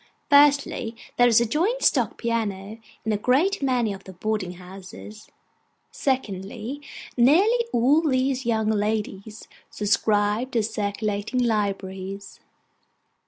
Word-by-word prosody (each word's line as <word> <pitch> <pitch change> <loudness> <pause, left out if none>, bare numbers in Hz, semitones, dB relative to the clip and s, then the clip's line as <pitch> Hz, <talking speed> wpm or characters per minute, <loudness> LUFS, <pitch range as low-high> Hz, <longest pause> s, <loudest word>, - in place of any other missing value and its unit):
Firstly, 285 -5 +4 0.2
there 245 - +6
is 230 -2 +5
a 235 - +2
joint 365 - 0
stock - - +2
piano 220 -3 -3 0.3
in 220 - 0
a 210 - +1
great 290 - +1
many 250 -6 +1
of 195 - -11
the 190 - -10
boarding 190 -1 -3
houses. 190 +4 -12 0.6
Secondly, 230 +1 -3 0.3
nearly 370 - +4
all 270 +7 +3
these 260 0 0
young 220 -2 0
ladies 210 0 -3 0.2
subscribe 210 +3 0
to 230 -3 +2
circulating 210 +2 -2
libraries. 195 -3 -3
220 Hz, 115 wpm, -24 LUFS, 205-255 Hz, 0.6 s, there